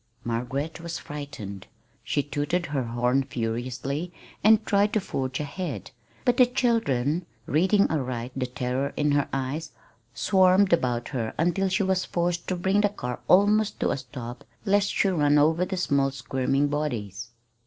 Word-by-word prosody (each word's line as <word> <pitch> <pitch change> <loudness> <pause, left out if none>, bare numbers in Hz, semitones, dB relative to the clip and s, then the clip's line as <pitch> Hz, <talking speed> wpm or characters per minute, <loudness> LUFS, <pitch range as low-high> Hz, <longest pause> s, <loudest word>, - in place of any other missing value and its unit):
Margaret 125 +7 -3
was 170 0 -4
frightened. 140 -10 -7 0.4
She 145 - 0
tooted 145 +5 -1
her 145 -3 -1
horn 120 +3 +1
furiously, 130 +5 -3 0.3
and 220 +1 +5
tried 205 0 +2
to 215 - +3
forge 130 -9 -3
ahead; 150 - -5 0.3
but 245 -1 +3
the 250 - +7
children, 180 - +1 0.2
reading 190 - +3
aright 130 -5 -2
the 130 -1 -1
terror 125 +2 -2
in 150 0 +2
her 145 -1 +1
eyes, 135 +4 -3 0.4
swarmed 190 0 +4
about 125 -6 +1
her 115 -5 -3
until 175 +4 +1
she 195 +2 +1
was 190 -1 +1
forced 175 0 -1
to 185 - 0
bring 190 +3 +2
the 205 - +3
car 125 -11 -5
almost 205 +3 +4
to - - +2
a - - -1
stop 125 -2 -8 0.2
lest 200 0 +3
she - - +2
run 150 -5 +3
over 160 +4 +3
the 190 - -4
small 140 -6 +2
squirming 135 +1 0
bodies. 120 -7 -3
145 Hz, 155 wpm, -26 LUFS, 125-185 Hz, 0.4 s, the